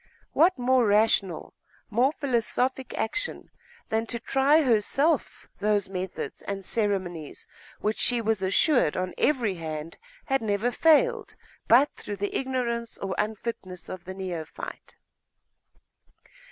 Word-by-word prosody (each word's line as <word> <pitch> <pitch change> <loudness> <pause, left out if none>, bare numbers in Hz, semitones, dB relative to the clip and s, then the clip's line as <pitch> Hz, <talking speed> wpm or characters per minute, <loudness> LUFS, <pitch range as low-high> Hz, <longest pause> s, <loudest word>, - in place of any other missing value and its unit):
What 345 +2 +4
more 250 -1 +3
rational, 205 -4 +2 0.4
more 245 +6 +3
philosophic 260 -2 -1
action 410 - -3 0.4
than 225 +1 0
to 235 - -2
try 275 +6 +3
herself 270 +5 +1
those 205 -1 +1
methods 185 -1 -5
and 195 -1 -5
ceremonies 185 -8 -2 0.4
which 215 +1 -1
she 245 -1 +3
was 220 -3 0
assured 195 - +3
on 185 0 -2
every 245 -9 +2
hand 160 -2 -6 0.3
had 270 -2 +1
never 215 +2 0
failed 325 - +3 0.3
but 260 +6 +6
through 205 - -6
the 200 +1 -3
ignorance 240 -3 -2
or 195 -1 -3
unfitness 210 -4 -4
of 185 -1 -7
the 185 +1 -7
neophyte?.... 175 -5 -7
220 Hz, 120 wpm, -27 LUFS, 190-260 Hz, 0.4 s, but